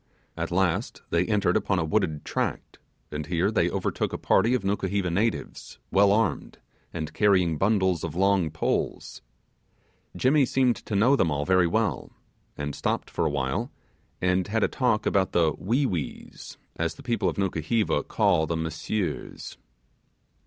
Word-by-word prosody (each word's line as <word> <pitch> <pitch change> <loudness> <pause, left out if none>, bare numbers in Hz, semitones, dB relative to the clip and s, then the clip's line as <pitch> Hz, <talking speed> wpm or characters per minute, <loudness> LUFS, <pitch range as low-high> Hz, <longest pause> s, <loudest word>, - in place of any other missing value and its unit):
At - - -3
last 90 -1 -1
they 85 +2 +2
entered 100 -4 +1
upon 95 - +1
a 85 - 0
wooded 80 -4 -1
tract, - - -3 0.3
and 75 0 -5
here 85 -2 +1
they - - +2
overtook - - -2
a - - -3
party 120 +3 +3
of 125 - -2
Nukuheva 95 -2 -1
natives, 105 +6 -2
well 100 0 +5
armed, 105 -7 0 0.3
and 80 -3 -5
carrying 90 -7 +2
bundles 95 -5 +2
of 85 -2 -4
long 95 -2 +2
poles. 75 0 -2 1.0
Jimmy 140 +3 +4
seemed 130 -2 +2
to 105 - -2
know 120 +8 +4
them 90 - +2
all 75 -1 -1
very 90 +1 +4
well, 110 +3 -1 0.5
and 75 0 -3
stopped - - -2
for 85 - 0
a - - +1
while, 65 -2 -2 0.5
and 90 0 +1
had 110 +1 0
a - - +4
talk 125 -5 0
about 95 -1 +1
the 80 -3 +3
'Wee 125 +9 0
Wees', 90 - -5 0.2
as 85 -1 -1
the - - -13
people 115 -6 0
of 80 - -6
Nukuheva 95 +1 0
call 80 0 +1
the 85 +1 -1
Monsieurs. 80 +2 -4
95 Hz, 160 wpm, -26 LUFS, 80-105 Hz, 1.0 s, well